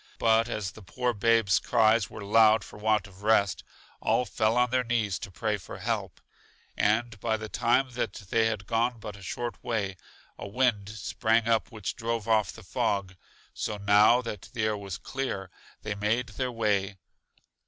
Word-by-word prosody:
But 115 +1 +3
as 105 -5 -3
the 110 - -13
poor 125 +6 -2
babes' 115 -3 +3
cries 110 -3 +3
were 110 - -8
loud 110 0 +5
for 105 - -12
want 105 -1 +2
of 95 -1 -15
rest, 105 -3 +2 0.4
all 125 - +2
fell 110 +1 +1
on 125 0 +3
their 130 0 +2
knees 110 -5 0
to - - -7
pray 105 +3 -1
for 95 - -9
help. - - -3 0.6
And, 110 +1 +1
by 110 +2 0
the 110 0 -6
time 130 +4 +2
that 115 -4 -2
they 110 +2 0
had 110 -3 -3
gone 115 +3 0
but 105 -2 -7
a 100 - -13
short 120 +5 -5
way, 100 -5 -2 0.4
a - - -6
wind 105 -2 +1
sprang 110 +2 0
up 115 +1 +1
which 110 -2 -4
drove 115 -2 -3
off 110 -4 +2
the - - -13
fog; 100 -2 -1 0.4
so, 105 - -3
now 105 +4 +5
that 105 -5 -7
the 110 - -2
air 110 0 +1
was 100 -3 -6
clear, 100 -9 -4 0.3
they 105 - -2
made 110 +4 0
their 125 +3 -3
way. 105 -4 0
110 Hz, 180 wpm, -28 LUFS, 100-115 Hz, 0.6 s, loud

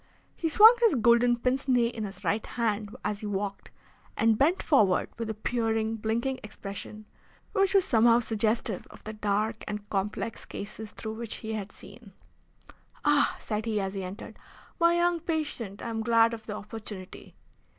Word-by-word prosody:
He 330 - -1
swung 440 +8 +9
his 460 -9 +4
golden 240 0 +4
pince 255 +3 0
nez 240 -2 +3
in 220 -2 -4
his 195 -1 -9
right 215 +1 0
hand 215 -2 -2
as 205 -1 -1
he 215 - -5
walked, 200 0 -4 0.5
and 225 0 +4
bent 315 - +2
forward 205 - +3
with 230 -1 -3
a 220 - -3
peering, 225 0 -1
blinking 235 +5 -1
expression, 210 +1 -8 0.5
which 390 0 +2
was 390 - +5
somehow 230 0 +5
suggestive 220 -3 0
of - - -15
the 215 - -6
dark 215 +1 -1
and 210 0 -5
complex 210 +3 -2
cases 215 +1 -8
through 220 -1 -6
which 230 0 -5
he 220 0 -5
had 210 -2 -5
seen. 205 -1 -14 0.9
"Ah," 295 -1 +4
said 215 +1 -3
he, 215 -2 0
as 195 -1 -2
he 195 -1 -4
entered. 185 +4 -8 0.4
"My 340 0 +4
young 345 0 +2
patient! 300 - -3
I 235 - -4
am 225 -1 -2
glad 230 0 +4
of 225 -1 -8
the 210 - -4
opportunity." 210 -3 -9
225 Hz, 170 wpm, -28 LUFS, 210-245 Hz, 0.9 s, swung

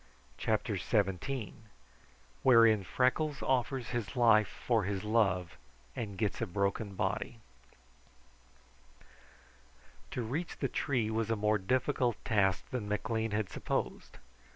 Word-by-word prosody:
CHAPTER - - 0
XVII 110 +5 -1 0.9
Wherein 115 -5 +6
Freckles 130 - 0
Offers 130 -1 0
His 115 -4 -3
Life 115 -4 +5
for 115 -2 0
His 95 -1 -2
Love 100 -5 +1 0.4
and 105 -6 -5
Gets 105 +1 -1
a 115 - 0
Broken 100 +2 -1
Body 105 +4 -2 2.7
To 125 - -3
reach 145 +10 -3
the - - -1
tree 120 -7 0
was 115 +1 -1
a 115 - +2
more 105 0 +1
difficult 125 +3 +1
task 95 -4 +2
than 115 -5 -3
McLean 110 +2 -1
had 105 -2 -1
supposed. - - -3
110 Hz, 115 wpm, -32 LUFS, 100-125 Hz, 2.7 s, Wherein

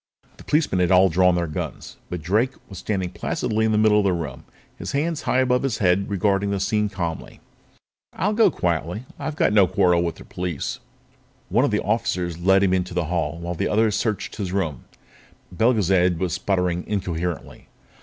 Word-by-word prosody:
The - - -13
policemen 150 - +1
had 90 -1 +2
all 95 +1 +6
drawn 90 +1 +3
their 85 -1 0
guns, 75 - -6
but 90 -3 -5
Drake 110 +10 +1
was 95 - -9
standing 95 -4 -2
placidly 110 +1 -1
in 110 - +2
the 105 - +2
middle 105 -1 +4
of - - +2
the 95 -2 +2
room, 85 -2 -5 0.3
his - - -6
hands 160 +2 -1
high 130 - +3
above 125 -1 +2
his 135 -6 -1
head 95 +1 +2
regarding 100 0 +1
the 100 -1 -1
scene 105 +1 0
calmly. 85 -4 -5 0.7
"I'll 205 +4 -1
go 225 +1 +5
quietly," 85 +1 -1
he - - -17
said. - - -20
"I've 155 - -4
got 165 - +2
no 100 -3 +6
quarrel 90 -1 +3
with 85 -2 -2
the - - -13
police." 90 -5 -4 0.7
One - - +3
of - - +1
the - - 0
officers 85 -2 -1
led 95 +2 +4
him 95 -2 +2
out - - +4
into 90 -1 -4
the 90 -2 0
hall 80 -2 -1
while 85 +1 -3
the 85 - -2
others 110 -1 +2
searched 110 -4 -2
his 95 -5 -3
room. 85 -8 -2 0.7
Belgezad 95 -4 +2
was 90 -1 -2
sputtering 90 -1 0
incoherently. 90 -5 -4
95 Hz, 200 wpm, -23 LUFS, 90-105 Hz, 0.7 s, all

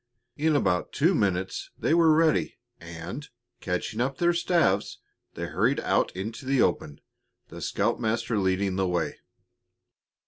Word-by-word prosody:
In 155 +2 +1
about 90 -10 0
two 165 +6 +3
minutes 95 - -1
they - - +1
were 165 -1 +5
ready, 160 0 +2 0.2
and, 85 - -8 0.3
catching 95 +5 -3
up 130 +1 -1
their 175 0 +3
staves, 170 - +1 0.4
they - - -4
hurried - - +1
out - - +1
into 110 +6 -5
the 135 0 +1
open, 75 -9 0 0.5
the - - -9
scoutmaster 115 0 0
leading 95 0 0
the 95 -1 +1
way. 90 -1 -2
110 Hz, 135 wpm, -27 LUFS, 95-150 Hz, 0.5 s, were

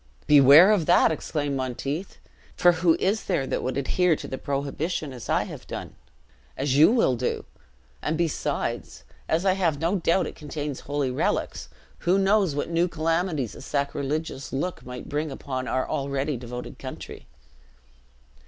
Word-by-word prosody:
"Beware 145 +6 +8
of 190 -7 +2
that!" 175 - +5
exclaimed 145 -2 -2
Monteith; 135 +7 -4 0.4
"for 175 - +5
who 170 -1 +3
is 205 +4 0
there 135 - 0
that - - -2
would 130 - -2
adhere 170 +5 +2
to - - -7
the 130 - -5
prohibition 140 +2 -3
as 125 - -9
I - - +2
have - - -9
done - - -6 0.6
as 135 0 0
you 150 +8 +7
will 230 - +3
do? 125 +1 -2 0.6
and 155 - -1
besides, 165 - -2 0.3
as 165 +4 +1
I 190 - +4
have 170 -6 0
no 170 +5 +1
doubt 180 +1 +2
it - - -6
contains 150 -2 -5
holy 145 -2 -2
relics, 60 - -1 0.3
who 180 +2 +2
knows 195 -5 +3
what 145 - -2
new 170 +1 +2
calamities 165 - -1
a - - -11
sacrilegious 140 +1 -3
look 170 +7 -3
might 125 0 -8
bring 150 +2 -2
upon 130 -2 -5
our 130 0 -1
already 140 +1 -1
devoted 125 0 -7
country?" - - -8
150 Hz, 160 wpm, -25 LUFS, 135-170 Hz, 0.6 s, Beware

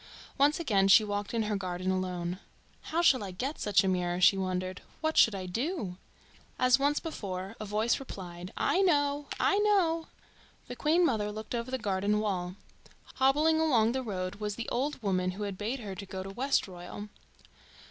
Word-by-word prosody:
Once 285 +3 +3
again 205 -12 +2
she 205 +3 +7
walked 205 -1 -3
in 230 -1 0
her 210 0 -1
garden 185 -1 -2
alone. 180 -1 -2 0.5
"How 335 +2 +1
shall 260 -9 +5
I 195 - -5
get 260 - -4
such 205 -1 +3
a - - 0
mirror?" 180 -1 0
she 195 +2 +6
wondered. 185 -1 -3 0.2
"What 315 0 -1
should 225 - +5
I 190 -1 -5
do?" 215 - -3 0.6
As 255 +1 +4
once 290 +1 +2
before, 195 - -5
a 215 - -5
voice 215 +5 +1
replied 180 -8 -8
"I 380 - +2
know! 290 -5 +2
I 400 - +3
know!" 360 -6 +2 0.6
The 245 - -6
Queen 325 +6 +3
mother 210 -8 0
looked 215 +2 -7
over 235 +1 -3
the 260 - -1
garden 205 -1 0
wall. 185 -4 -2 0.6
Hobbling 300 +5 +3
along 240 -9 +3
the 260 +1 -1
road 185 -6 -4
was 210 -1 -3
the 235 - -5
old 280 +4 -1
woman 185 -2 0
who 210 +3 -5
had 200 -2 -3
bade 225 +7 -3
her 200 -3 -6
go 190 0 -6
to 195 - -7
Westroyal. 205 -5 -2
210 Hz, 180 wpm, -30 LUFS, 185-275 Hz, 0.6 s, she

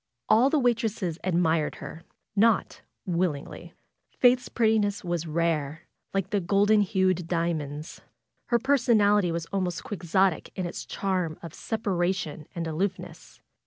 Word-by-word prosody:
All 230 +5 +5
the 310 - +2
waitresses 225 - 0
admired 165 -4 +1
her; 160 - -9 0.3
not 220 0 +2 0.2
willingly. 170 -5 -3 0.4
Faith's 250 0 +4
prettiness 220 -3 +1
was 175 -2 -2
rare, 160 -1 -1 0.3
like 195 -1 -2
the 205 - +2
golden 205 +3 +3
hued 185 -4 +1
diamonds. 160 -3 -3 0.4
Her 240 - +2
personality 220 -8 +3
was 165 0 -3
almost 180 -3 -1
quixotic 185 -2 0
in 185 - -3
its 175 - -6
charm 185 -5 -2
of 165 -2 -8
separation 180 -7 -2
and 170 -1 -3
aloofness. 180 +5 -4
185 Hz, 125 wpm, -27 LUFS, 165-210 Hz, 0.4 s, All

